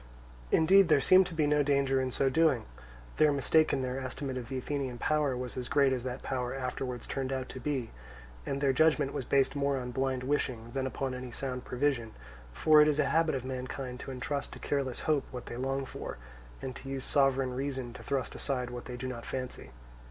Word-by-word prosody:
Indeed 190 Hz, +4 st, +6 dB
there 155 Hz, -3 st, +5 dB
seemed 185 Hz, +7 st, +6 dB
to 170 Hz, -, -8 dB
be 155 Hz, -2 st, +2 dB
no 150 Hz, 0 st, +3 dB
danger 140 Hz, -2 st, +2 dB
in 130 Hz, -, -1 dB
so 135 Hz, +2 st, +1 dB
doing; 130 Hz, -5 st, +3 dB, 0.5 s
their 155 Hz, -1 st, +5 dB
mistake 150 Hz, +3 st, +3 dB
in 130 Hz, -, 0 dB
their 130 Hz, +1 st, -2 dB
estimate 130 Hz, +1 st, -4 dB
of 125 Hz, -2 st, -5 dB
the 135 Hz, -, -3 dB
Athenian 130 Hz, -1 st, -3 dB
power 145 Hz, -1 st, +1 dB
was 125 Hz, -1 st, -5 dB
as 125 Hz, -1 st, -4 dB
great 140 Hz, -2 st, +4 dB
as 125 Hz, -, -1 dB
that 130 Hz, 0 st, -5 dB
power 125 Hz, -1 st, -2 dB
afterwards 125 Hz, -2 st, -4 dB
turned 135 Hz, -1 st, -3 dB
out 130 Hz, -1 st, -3 dB
to 130 Hz, -, -7 dB
be, 130 Hz, -3 st, -2 dB, 0.5 s
and 140 Hz, -, -3 dB
their 135 Hz, -2 st, +3 dB
judgment 150 Hz, -1 st, +3 dB
was 130 Hz, -, -3 dB
based 140 Hz, +1 st, +2 dB
more 140 Hz, 0 st, +1 dB
upon 125 Hz, -1 st, -4 dB
blind 130 Hz, 0 st, -1 dB
wishing 125 Hz, -4 st, -1 dB
than 130 Hz, +1 st, -1 dB
upon 130 Hz, 0 st, -3 dB
any 125 Hz, 0 st, -6 dB
sound 125 Hz, 0 st, -4 dB
prevision; 125 Hz, -4 st, -1 dB, 0.4 s
for 155 Hz, -, +6 dB
it 150 Hz, -, +6 dB
is 150 Hz, -1 st, +2 dB
a 150 Hz, -, +3 dB
habit 160 Hz, -2 st, +3 dB
of 130 Hz, -1 st, -4 dB
mankind 130 Hz, 0 st, -5 dB
to -, -, -7 dB
entrust 135 Hz, +2 st, -3 dB
to -, -, -8 dB
careless 135 Hz, -3 st, -2 dB
hope 150 Hz, -3 st, +1 dB
what 125 Hz, -1 st, -7 dB
they -, -, -6 dB
long 135 Hz, +1 st, -1 dB
for, 125 Hz, -, -7 dB, 0.5 s
and 130 Hz, -2 st, -4 dB
to 135 Hz, -, -9 dB
use 135 Hz, -1 st, -3 dB
sovereign 135 Hz, -2 st, +2 dB
reason 130 Hz, -2 st, -3 dB
to -, -, -10 dB
thrust 135 Hz, -2 st, -2 dB
aside 125 Hz, -3 st, -2 dB
what 120 Hz, 0 st, -7 dB
they 125 Hz, -1 st, -6 dB
do 130 Hz, +1 st, -4 dB
not 120 Hz, -2 st, -5 dB
fancy. 130 Hz, -, -5 dB
135 Hz, 220 wpm, -31 LUFS, 125-140 Hz, 0.5 s, Indeed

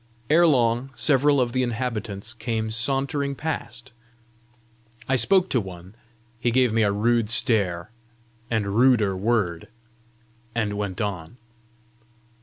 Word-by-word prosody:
Ere 170 Hz, +2 st, +5 dB
long, 120 Hz, -2 st, +1 dB
several 145 Hz, +1 st, +3 dB
of 125 Hz, -2 st, 0 dB
the 130 Hz, -, 0 dB
inhabitants 115 Hz, -4 st, -3 dB
came 110 Hz, -1 st, -3 dB
sauntering 140 Hz, +4 st, -1 dB
past. 135 Hz, -6 st, -5 dB, 1.2 s
I 135 Hz, -, +2 dB
spoke 185 Hz, -, +3 dB
to 125 Hz, -, +1 dB
one: 95 Hz, -1 st, -11 dB, 0.5 s
he 120 Hz, -, 0 dB
gave 125 Hz, -1 st, +2 dB
me 115 Hz, -, +2 dB
a 105 Hz, -2 st, +2 dB
rude 115 Hz, +2 st, +1 dB
stare 105 Hz, -7 st, +2 dB, 0.6 s
and 110 Hz, -3 st, 0 dB
ruder 115 Hz, -5 st, +3 dB
word, 95 Hz, -5 st, -1 dB, 0.9 s
and 105 Hz, -3 st, -1 dB
went 100 Hz, -1 st, -4 dB
on. 95 Hz, -1 st, -5 dB
115 Hz, 120 wpm, -24 LUFS, 105-130 Hz, 1.2 s, Ere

